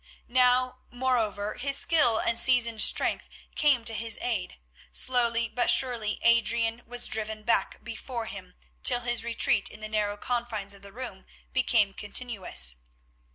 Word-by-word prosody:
Now, 255 0 +2
moreover, 230 -5 -1
his 275 +2 -1
skill 270 -9 +3
and 230 - +1
seasoned 235 -3 +3
strength - - +1 0.2
came 275 -6 +2
to 225 - +1
his 225 0 -3
aid; 200 - -4 0.3
slowly 235 -2 +1
but 245 - -1
surely 235 -5 +2
Adrian 235 0 +2
was 245 0 +2
driven 220 -2 -3
back 230 - -1
before 235 0 -6
him 185 -4 -10 0.3
till 245 -1 +3
his 240 -1 +1
retreat 230 -3 +2
in - - -12
the 215 - -6
narrow 210 -1 -2
confines 225 -4 -3
of 200 - -11
the 200 0 -11
room 230 -4 -9 0.3
became 230 -6 +2
continuous. 200 - 0
230 Hz, 145 wpm, -27 LUFS, 215-245 Hz, 0.3 s, skill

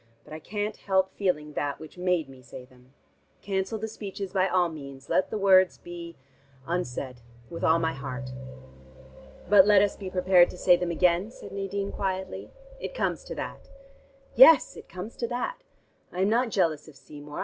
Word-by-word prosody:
But - - -13
I 155 - -6
can't 210 +5 -4
help 190 -1 +1
feeling 150 -7 -1
that 145 -1 -2
which 155 - -11
made 180 -4 0
me 135 -1 -14
say 125 0 -11
them. 125 0 -22 0.5
Cancel 195 +2 -2
the 220 +1 -4
speeches 200 -3 -7
by 190 -1 +2
all 180 -1 +2
means. 140 -4 -10
Let 185 - +2
the - - -3
words 190 -2 +5
be 170 -1 -9 0.5
unsaid 130 -7 -4 0.3
with 170 - -6
all 160 - +4
my 160 -1 0
heart." 130 -1 -6 1.2
"But 195 0 +7
let 205 -1 +6
us 205 - 0
be 195 -2 -7
prepared 180 -1 +4
to - - -9
say 180 0 +5
them 175 0 -2
again?" 175 +3 +2
said 245 - -12
Nadine 200 0 -3
quietly. 190 -1 -4 0.3
"It - - -6
comes - - -1
to - - -7
that." - - -7 0.6
"Yes, 325 - +7
it - - -12
comes 185 +5 -8
to 235 - -2
that. 255 - -3 0.5
I 180 - -3
am 195 - +3
not 240 +2 +2
jealous 165 -8 0
of 155 - -14
Seymour. 145 0 -10
180 Hz, 180 wpm, -27 LUFS, 155-200 Hz, 1.2 s, But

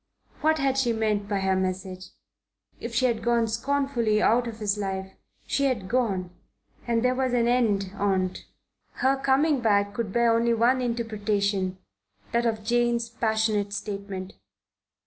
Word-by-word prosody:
What 315 +1 +2
had 270 -2 +1
she 240 -3 +1
meant 210 -2 -1
by 200 -2 0
her 190 0 +1
message? 185 0 -3 0.7
If 235 0 -6
she 255 - +3
had 235 -3 +1
gone 235 0 +2
scornfully 235 -2 0
out 240 +3 +3
of 225 -2 -6
his 210 -2 0
life, 190 -2 -4 0.3
she 280 - 0
had 235 -8 -1
gone, 195 -7 0 0.6
and 235 0 +1
there 250 - +3
was 255 -1 -1
an 235 -1 +2
end 210 -6 +1
on't. 190 -2 -1 0.5
Her 265 +1 +2
coming 275 +2 +2
back 200 -2 +2
could 230 -4 -3
bear 235 +1 +3
only 235 0 +2
one 245 +3 +3
interpretation 205 -5 -1 0.5
that 235 0 +1
of 220 -2 -2
Jane's 235 0 +1
passionate 220 -3 0
statement. 200 -2 -5
225 Hz, 150 wpm, -26 LUFS, 200-240 Hz, 0.7 s, she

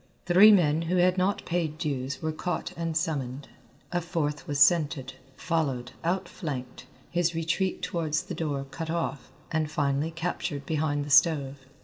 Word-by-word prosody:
Three 190 +5 +8
men 160 -6 +4
who 180 - +2
had 180 +1 +3
not 190 +2 0
paid 165 -3 -1
dues 140 -3 -3
were 160 - 0
caught 160 +2 -3
and 165 -1 -2
summoned. 140 -5 -3 0.4
A 175 0 0
fourth 160 -4 -2
was 145 - -2
scented, 150 -3 +3 0.2
followed, 140 -8 -1
outflanked, 150 -8 -4 0.2
his 175 -1 +1
retreat 165 +4 -1
towards 165 -4 -1
the - - -6
door 145 -4 -2
cut 165 -1 -5
off, 165 -4 -3 0.2
and 155 -2 0
finally 145 0 0
captured 160 -4 -3
behind 145 -2 -1
the 145 - -6
stove. 140 -2 +4
160 Hz, 150 wpm, -27 LUFS, 145-170 Hz, 0.4 s, Three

